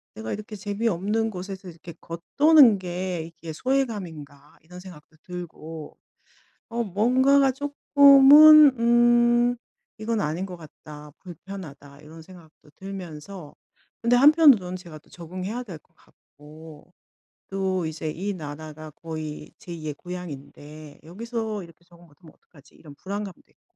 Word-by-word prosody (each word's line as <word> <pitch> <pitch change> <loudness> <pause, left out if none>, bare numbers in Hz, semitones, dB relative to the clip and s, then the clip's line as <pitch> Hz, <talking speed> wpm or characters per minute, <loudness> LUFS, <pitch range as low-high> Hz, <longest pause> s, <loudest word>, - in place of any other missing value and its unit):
'내가 110 +1 -6
이렇게 215 +1 -8
재미없는 210 +1 -2
곳에서 190 0 -8
이렇게 170 0 -12
겉도는 240 - +4
게 180 -1 -4
이게 165 -1 -10
소외감인가?' 175 - -4
이런 180 +3 -13
생각도 165 -4 -14
들고 165 -3 -9 0.7
어 235 0 -2
뭔가가 260 +7 +2
쪼끔은 285 0 +6
음 240 +1 +3 0.4
'이건 220 -1 -2
아닌 160 +5 -3
것 185 - -9
같다. 150 -1 -13
불편하다.' 165 -6 -11
이런 160 +2 -13
생각도 160 -3 -18
들면서 185 -3 -10 0.5
근데 235 +1 +2
한편으로는 275 - +5
제가 170 -4 -12
또 - - -28
적응해야 185 +8 -7
될 185 -8 -9
것 - - -39
같고 155 +2 -17 0.6
또 190 -3 -2
이제 160 0 -5
이 195 +6 -4
나라가 155 -1 -9
거의 155 -1 -8
제2 170 -6 -9
의 150 - -3
고향인데 155 -3 -10
'여기서 220 +3 -5
이렇게 170 0 -18
적응 175 -1 -20
못 145 - -24
하면 160 -3 -17
어떡하지?' 145 -3 -23
이런 150 -3 -15
불안감도 200 +2 -7
있고. - - -39
180 Hz, 295 characters per minute, -24 LUFS, 160-225 Hz, 0.7 s, 쪼끔은